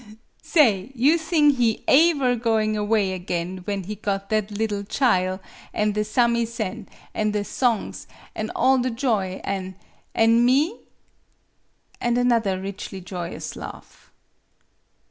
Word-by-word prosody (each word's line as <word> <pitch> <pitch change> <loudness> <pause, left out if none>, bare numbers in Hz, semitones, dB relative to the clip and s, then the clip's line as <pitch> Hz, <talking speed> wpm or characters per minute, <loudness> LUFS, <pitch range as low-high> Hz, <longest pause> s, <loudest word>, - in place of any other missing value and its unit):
Sa 330 - +3
ay 210 -3 +2
you 270 +7 +4
thing 315 -2 +3
he 240 -5 0
aever 280 -4 +4
going 220 -2 +1
away 210 -2 +1
again 180 0 -3
when 200 -2 -2
he 205 +4 -5
got 200 -1 -3
that 215 -1 +1
liddle 205 -1 -2
chile, 190 -5 +1 0.4
an' 210 0 +1
the 210 +1 0
samisen, 235 -2 0 0.3
an' 210 -1 0
the 210 -1 0
songs, 235 -3 -1 0.3
an' - - -4
all 265 0 +4
the 250 +1 0
joy, 225 -7 -1
an' 190 -1 -4 0.4
an' 230 +1 +4
me?" 285 - +2 1.2
And 240 0 +1
another 230 -6 +2
richly 195 0 -6
joyous 175 -2 -6
laugh. - - -11
215 Hz, 130 wpm, -23 LUFS, 195-245 Hz, 1.2 s, you